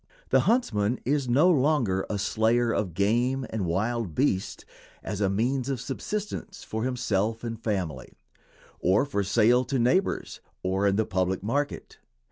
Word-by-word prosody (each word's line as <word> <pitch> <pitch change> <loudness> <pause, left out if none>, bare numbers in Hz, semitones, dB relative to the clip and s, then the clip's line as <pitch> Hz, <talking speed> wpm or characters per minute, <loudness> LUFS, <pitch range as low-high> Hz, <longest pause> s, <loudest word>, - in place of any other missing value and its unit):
The - - +6
huntsman 120 - +1
is 140 -1 0
no 140 +8 +5
longer 130 - +1
a 105 - -1
slayer 115 +4 +1
of 95 -7 -2
game 120 +7 +1
and 105 -5 -2
wild 105 +1 -1
beasts 115 -9 0 0.4
as 105 -1 -4
a 100 - +2
means 125 +6 0
of 135 -3 -2
subsistence 200 - -5
for 110 +1 -4
himself 115 -3 -1
and 115 -1 -5
family, 90 - -3 0.6
or 95 +9 +3
for 115 -8 -1
sale 115 +5 +3
to 135 +3 -1
neighbors 150 +11 +1 0.2
or 95 +2 +1
in 100 - +2
the 110 +1 +1
public 95 0 -1
market. 140 +7 -3
115 Hz, 150 wpm, -27 LUFS, 100-130 Hz, 0.6 s, The